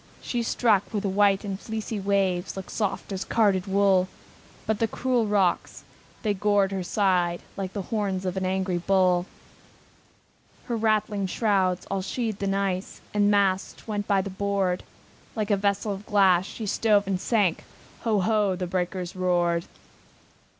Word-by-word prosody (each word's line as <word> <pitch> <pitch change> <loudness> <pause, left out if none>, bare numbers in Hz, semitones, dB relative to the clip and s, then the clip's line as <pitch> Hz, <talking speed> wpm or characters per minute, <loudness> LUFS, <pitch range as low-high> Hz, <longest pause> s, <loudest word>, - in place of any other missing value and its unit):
She 240 - -2
struck 225 -3 +2
where 210 -3 -1
the 200 - -1
white 200 +1 +3
and 195 -1 -4
fleecy 220 -1 -4
waves 195 -2 0
Looked 190 - -7
soft 200 -2 -2
as 190 -1 -2
carded 200 -4 +2
wool, 195 -1 +3 0.6
But 220 -1 0
the 225 - +2
cruel 245 0 0
rocks, 200 -4 0 0.4
they 210 -2 +1
gored 200 0 +2
her 190 -1 -2
side 180 -2 +1
Like 190 -1 -4
the 200 - -3
horns 195 -2 -2
of 185 0 -2
an 190 - -2
angry 185 -1 0
bull. 185 -1 +2 1.4
Her 240 - -2
rattling 215 -3 +1
shrouds, 190 -3 +1
all 195 -1 0
sheathed 215 +1 -3
in 195 0 0
ice, 195 -1 -2
With 205 -1 +3
the - - +4
masts 200 -1 +1
went 205 -2 -3
by 195 -2 +2
the 200 - -5
board; 195 -2 0 0.5
Like 215 -1 -1
a - - +5
vessel 200 +1 0
of 200 +2 -9
glass, 190 -3 +4
she 225 - -6
stove 205 0 +2
and 190 -1 -1
sank, 205 -8 +1 0.4
Ho! 215 -4 +1
ho! 210 -1 +2
the 180 0 -3
breakers 180 0 -3
roared! 175 -2 +1
195 Hz, 165 wpm, -26 LUFS, 185-210 Hz, 1.4 s, a